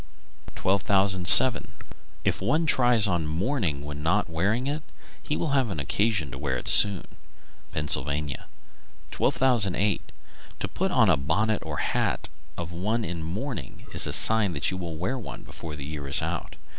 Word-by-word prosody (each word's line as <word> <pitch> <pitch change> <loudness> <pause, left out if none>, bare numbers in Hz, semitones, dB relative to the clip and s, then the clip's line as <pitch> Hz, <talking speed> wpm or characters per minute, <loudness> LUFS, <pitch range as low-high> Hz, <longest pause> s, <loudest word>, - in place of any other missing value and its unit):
_ - - -13
1207. 95 +3 +5 0.6
If - - -1
one 155 - 0
try 125 -5 +3
on 85 -5 -1
mourning 85 - -2
when 75 0 -7
not 90 +7 0
wearing 100 +10 -1
it, 145 +3 -3 0.4
he 150 - -3
will 165 - -2
have 135 -4 +1
occasion 90 - -1
to 65 - -8
wear 65 -3 -2
it - - -7
soon. 100 -4 +6 0.7
Pennsylvania. 75 -1 0 0.7
1208. 105 -7 +1 0.5
To - - -2
put - - -3
on - - +3
a - - +2
bonnet 105 +11 -1
or 75 -2 -6
hat - - -2 0.3
of 85 -1 -6
one 105 +7 -2
in 85 0 -5
mourning 90 - -6
is - - +2
a - - -3
sign 110 -5 +5
that 70 - -2
you 95 - -5
will 85 -3 -6
wear 125 +11 -3
one 115 - -9
before 80 -2 -9
the 70 -2 -8
year 75 -2 -7
is 70 - +3
out. - - -5
95 Hz, 160 wpm, -25 LUFS, 75-110 Hz, 0.7 s, soon